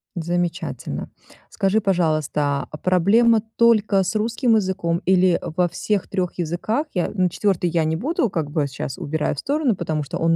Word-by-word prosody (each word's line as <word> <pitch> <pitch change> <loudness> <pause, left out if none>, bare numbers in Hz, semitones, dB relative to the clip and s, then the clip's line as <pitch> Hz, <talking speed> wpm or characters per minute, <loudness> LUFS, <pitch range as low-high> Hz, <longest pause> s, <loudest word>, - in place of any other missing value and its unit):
Замечательно. 175 +1 -3 0.4
Скажи, 200 +1 +1
пожалуйста, 155 -7 0
а, 155 - -7
проблема 210 +7 +3
только 215 -4 +4
с 190 +4 -3
русским 225 +2 +1
языком, 185 -4 0
или 185 -1 +4
во 175 +2 0
всех 205 +3 -2
3 185 -3 -3
языках? 195 - -1
Я 180 - 0
на 185 -3 +1
4 180 -1 0
я 165 -1 +1
не 160 +1 0
буду, 255 - 0
как 160 -6 -3
бы, 150 -1 0
сейчас 130 -1 -6
убираю 150 0 -2
в - - -6
сторону, 285 -5 0
потому 160 -4 -2
что 140 - -5
он 165 0 +2
180 Hz, 170 wpm, -22 LUFS, 165-215 Hz, 0.4 s, только